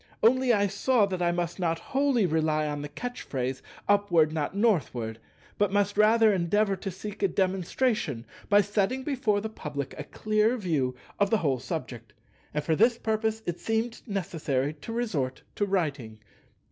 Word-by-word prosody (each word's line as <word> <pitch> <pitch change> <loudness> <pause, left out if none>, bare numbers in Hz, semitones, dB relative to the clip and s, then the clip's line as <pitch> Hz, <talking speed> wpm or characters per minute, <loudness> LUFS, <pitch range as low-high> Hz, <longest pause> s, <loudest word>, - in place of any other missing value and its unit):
Only 255 +2 +5
I 205 -3 +3
saw 210 +3 +2
that 185 -2 -3
I 175 0 +3
must 175 +1 -2
not 165 -2 +1
wholly 270 0 +1
rely 155 -2 +1
on 145 -1 -3
the 145 - -6
catch 245 +11 -6
phrase, 130 -1 -3 0.3
"Upward, 175 -7 +3
not 160 +4 -2
Northward," 130 - 0 0.4
but 205 -2 +2
must 205 0 +1
rather 215 +1 +5
endeavour 195 +3 +2
to 195 +1 -5
seek 200 +3 -7
a 200 - +4
demonstration 185 - 0 0.2
by 205 0 +6
setting 205 +6 0
before 240 -8 0
the 220 - -3
public 145 -9 -5
a - - -3
clear 215 - +1
view 150 - 0 0.2
of 200 -1 +3
the 225 - +3
whole 140 -9 0
subject; 120 -8 -6 0.4
and 150 0 -2
for 160 - +1
this 230 +6 +4
purpose 220 0 -1
it 175 -1 -3
seemed 225 +1 -1
necessary 155 - -1
to 155 +9 -9
resort 165 - -2
to 205 - -1
writing. 145 - -1
195 Hz, 170 wpm, -28 LUFS, 155-215 Hz, 0.4 s, by